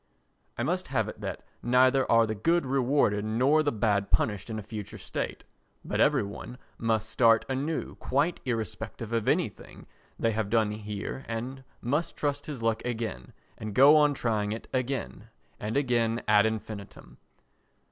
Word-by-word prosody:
I - - -1
must - - -1
have - - 0
it - - -8
that - - -5 0.2
neither 130 +2 +4
are 115 0 +6
the 110 - -2
good 165 +9 +1
rewarded 130 -5 +2
nor 130 +8 +3
the 145 -1 +1
bad 105 -3 +1
punished 105 +1 +1
in 110 - -3
a 110 - -5
future 105 -1 -7
state, - - -4 0.4
but - - -2
every - - +4
one 105 +5 -8 0.2
must 110 -1 0
start 115 0 +4
anew 140 +4 -2
quite 145 +6 0
irrespective 115 -1 -4
of 115 -2 0
anything - - -1 0.3
they 115 - +1
have 110 -2 -1
done 110 -1 +2
here 105 +4 -5
and 125 +4 -5 0.2
must 145 +8 -1
try 145 -1 +1
his 140 -7 -6
luck 115 -1 +1
again 110 - -4 0.3
and 110 -2 -5
go 140 +4 +8
on 150 -1 +4
trying 110 -4 0
it 115 - -7
again 130 - -3 0.3
and 110 +5 -2
again 120 -4 +1
ad 105 0 +5
infinitum. 110 -2 -7
115 Hz, 160 wpm, -28 LUFS, 110-130 Hz, 0.4 s, go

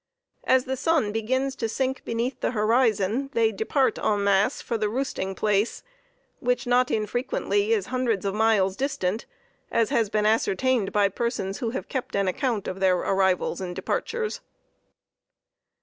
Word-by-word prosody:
As 260 -1 +3
the 265 - -2
sun 285 -5 +1
begins 260 +5 -1
to 225 - -2
sink 265 +3 -2
beneath 235 +3 -2
the - - 0
horizon, 225 +2 +2
they 225 -1 +3
depart 225 +4 0
en 205 -1 +1
masse 200 +5 +2
for 235 - -3
the 215 -2 0
roosting 210 -6 -3
place, 210 +2 0 0.6
which 250 0 0
not 245 +1 +3
infrequently 250 - 0
is 435 -4 +2
hundreds 245 -6 -1
of 195 - 0
miles 210 -3 +2
distant, 220 -6 -2 0.4
as 230 +2 +1
has 230 -6 +2
been 210 0 0
ascertained 225 +1 +1
by 205 -1 +3
persons 200 -2 -3
who 235 - -1
have 245 - -5
kept 260 -2 -4
an 200 -1 +1
account 225 +1 -1
of 185 - -4
their 185 -1 +3
arrivals 190 -1 +1
and 180 -1 -5
departures. 465 - -2
225 Hz, 155 wpm, -25 LUFS, 200-260 Hz, 0.6 s, As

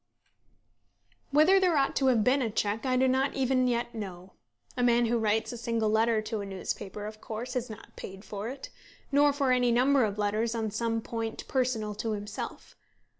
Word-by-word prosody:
Whether 310 +7 +5
there 360 -4 +3
ought 275 -1 +1
to 270 - +2
have 235 -4 +4
been 265 +5 +3
a 235 - 0
cheque 215 +3 -1
I 255 0 +2
do 260 +1 +4
not 265 +2 +1
even 260 -1 +2
yet 240 0 -1
know. 185 -4 -7 0.4
A 250 - -1
man 240 -1 +4
who 235 +1 +1
writes 220 0 +1
a 240 - -7
single 230 -2 0
letter 220 0 +2
to 215 -1 -3
a - - -5
newspaper 195 +1 -5
of 215 0 -8
course 235 +3 -6
is 250 -1 -2
not 220 +1 -11
paid 195 +2 -9
for 205 +2 -5
it, 270 +1 -8 0.4
nor 285 +1 +5
for 275 -2 +1
any 250 -1 +3
number 260 +3 +4
of 210 -1 -1
letters 215 +3 0
on 220 -2 -2
some 225 +1 -1
point 225 -1 -5
personal 245 -5 0
to 215 +1 -3
himself. 205 0 -6
230 Hz, 195 wpm, -29 LUFS, 215-255 Hz, 0.4 s, Whether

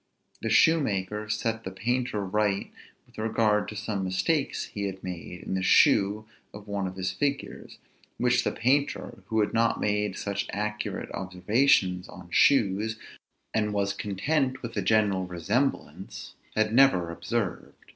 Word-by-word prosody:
The 115 - -2
shoemaker 105 - +2
set 115 +1 -1
the - - -4
painter 115 +1 -1
right 100 0 0 0.3
with - - -14
regard 110 -1 +1
to 105 - -7
some 105 -2 -3
mistakes 95 - 0
he 100 -1 -3
had 95 -1 -5
made 90 -1 -7
in - - -4
the 95 - 0
shoe 100 +3 +4 0.3
of 105 0 -11
one 100 -2 -2
of 95 - -7
his 95 0 -2
figures, 140 +8 -3 0.4
which 125 0 +2
the - - 0
painter, 140 +5 0
who 110 -1 +1
had 105 - 0
not 115 0 +2
made 105 -1 0
such 100 0 -3
accurate 105 +1 -3
observations 95 0 +1
on 90 -2 -12
shoes, 110 -4 +3 0.6
and 105 -1 0
was 100 -1 0
content 130 +8 -1
with 115 -1 -6
a 100 - 0
general 100 -2 +2
resemblance, 100 - -2 0.2
had 110 0 +1
never 115 -10 +4
observed. 90 +4 -3
105 Hz, 145 wpm, -27 LUFS, 95-115 Hz, 0.6 s, shoe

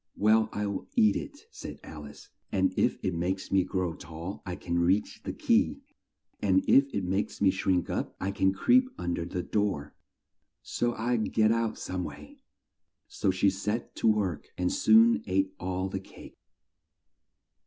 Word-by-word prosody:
"Well, 110 +1 +4
I'll 105 -1 -3
eat 105 -2 +5
it," - - -6
said - - -8
Al 75 -1 -9
ice, 70 - -13 0.2
"and 95 -1 +1
if - - +2
it 95 - 0
makes 90 +3 -2
me 95 -1 +4
grow 90 -2 -2
tall, 80 +5 -8
I 90 - -3
can 85 -1 -2
reach 90 +4 +1
the - - -4
key, - - +1 0.6
and 95 -2 +3
if 135 0 +5
it 100 - -2
makes 95 +3 -2
me 100 -2 +4
shrink 95 -2 0
up, - - -3
I 95 - -1
can 95 -1 +2
creep 250 - +3
un 90 0 -2
der 85 - -3
the 90 +1 -4
door; 100 -9 -1 0.7
so 120 0 -1
I'll 120 +1 0
get 110 0 +2
out 115 -1 0
some 90 0 -4
way." 75 -1 -10 0.7
So - - -1
she 95 +1 +3
set 105 +4 -3
to - - +1
work 100 -7 +1
and 90 0 0
soon 230 +2 +5
ate 95 0 +1
all 95 +1 -2
the 95 0 -4
cake. 95 - -14
95 Hz, 170 wpm, -29 LUFS, 90-105 Hz, 0.7 s, eat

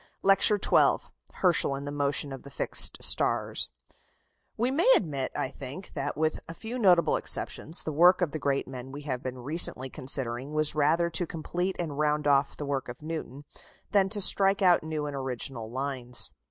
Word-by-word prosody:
LECTURE 195 +2 +5
XII - - +2 0.2
HERSCHEL 175 -6 +2
AND 140 +1 -6
THE 145 - -5
MOTION 145 -1 0
OF 135 - -8
THE 140 - -12
FIXED - - 0
STARS - - +1 0.9
We 240 +3 0
may 340 - +4
admit, 140 -7 -1
I - - -1
think, 140 +7 -7
that, 145 0 -4
with 155 0 0
a 165 - -7
few 235 +6 -6
notable 180 -6 +4
exceptions, 160 +3 -1
the 155 - -3
work 175 +5 +5
of 160 - -1
the 155 - -4
great 140 -1 -1
men 130 0 -8
we 145 +2 -8
have 130 -4 -3
been 130 0 -6
recently 130 -1 0
considering 130 -1 -3
was 155 -1 +4
rather 160 +3 +2
to 170 +1 -1
complete 175 +4 -3
and 150 -4 -4
round 150 0 +1
off 140 -1 +2
the 145 - -5
work 140 -3 -3
of 120 +4 -9
Newton, 155 -3 -6 0.5
than 195 -1 +3
to 205 0 0
strike 195 +1 +4
out 180 -2 +5
new 155 -1 -4
and 145 -1 -5
original 125 -3 -4
lines. 130 -1 -4
150 Hz, 185 wpm, -28 LUFS, 135-175 Hz, 0.9 s, LECTURE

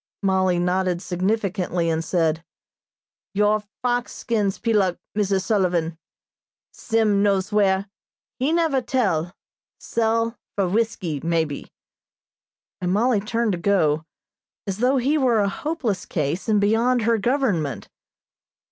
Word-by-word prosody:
Mollie 190 -2 +2
nodded 180 0 0
significantly 185 -1 -1
and 165 0 0
said: 165 -2 0 0.9
"Your 210 +1 +3 0.2
fox 245 -1 0
skins 210 -4 -1
peeluk, 205 -6 +1 0.2
Mrs. 195 -2 +1
Sullivan. 180 -6 +1 0.8
Sim 220 -3 +1
knows 200 0 +1
where 200 -1 +2 0.5
he 270 +4 +1
never 325 -5 +2
tell 195 -9 0 0.4
sell 230 0 0 0.2
for 195 -2 +1
whiskey, 190 -6 -1
maybe," 165 -3 -1 1.1
and 180 0 0
Mollie 225 +3 +2
turned 225 +2 -1
to 180 - -2
go, 160 -6 +2 0.6
as 195 0 -4
though 255 +3 +3
he 280 +5 +2
were 245 -5 +3
a 200 - +2
hopeless 245 - -3
case, 155 +6 -2
and 210 -1 +4
beyond 225 +4 +2
her 230 0 +2
government. 195 - 0
200 Hz, 120 wpm, -23 LUFS, 180-230 Hz, 1.1 s, and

